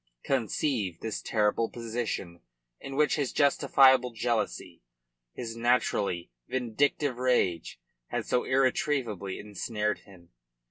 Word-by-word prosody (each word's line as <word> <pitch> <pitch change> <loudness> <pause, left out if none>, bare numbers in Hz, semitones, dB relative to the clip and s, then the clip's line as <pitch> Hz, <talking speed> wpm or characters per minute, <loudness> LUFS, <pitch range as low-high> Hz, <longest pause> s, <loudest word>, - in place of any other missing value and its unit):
Conceive 115 - -1
this 110 -2 -3
terrible 110 +1 +1
position 110 -7 -4 0.4
in 135 - -7
which 150 +2 +3
his 140 -4 -1
justifiable 130 -3 +5
jealousy 115 -1 -2 0.5
his 115 -2 -6
naturally 115 - 0 0.2
vindictive 130 +2 0
rage 125 -10 0 0.3
had - - -3
so 125 - +1
irretrievably 130 -7 0
ensnared 105 +1 -3
him. 90 -4 -18
115 Hz, 100 wpm, -29 LUFS, 105-130 Hz, 0.5 s, justifiable